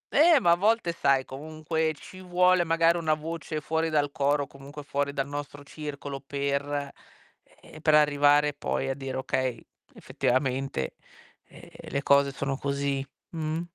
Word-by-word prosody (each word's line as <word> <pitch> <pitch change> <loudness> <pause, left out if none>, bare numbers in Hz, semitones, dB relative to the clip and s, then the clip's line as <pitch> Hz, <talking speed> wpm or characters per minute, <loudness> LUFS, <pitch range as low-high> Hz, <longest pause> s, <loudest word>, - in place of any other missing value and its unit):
Eh, 315 0 +7
ma 170 -7 +3
a - - +6
volte 210 -1 +2
sai 140 -5 +2
comunque 155 +3 -2
ci 185 +5 -12
vuole 180 0 +3
magari 165 +1 +3
una 155 -2 +1
voce 155 0 -5
fuori 160 +2 -1
dal 145 -2 +1
coro, 145 +1 +1
o - - -8
comunque 140 +1 -11
fuori 140 0 -1
dal 140 0 -2
nostro 145 0 -6
circolo, 145 -2 -7
per 140 0 -1 0.8
e - - -21
ehm, 155 - -10
per 155 -1 +4
arrivare 145 0 +4
poi 135 -1 -2
a - - +1
dire: 135 -1 -5
"Okay, 130 -2 -1 0.4
effettivamente, 130 - -1 0.5
ehm, - - -15 0.2
le 140 0 -2
cose 140 0 +4
sono 135 0 -3
così." 140 -1 -1 0.3
Mh? 160 0 -3
145 Hz, 155 wpm, -27 LUFS, 140-160 Hz, 0.8 s, Eh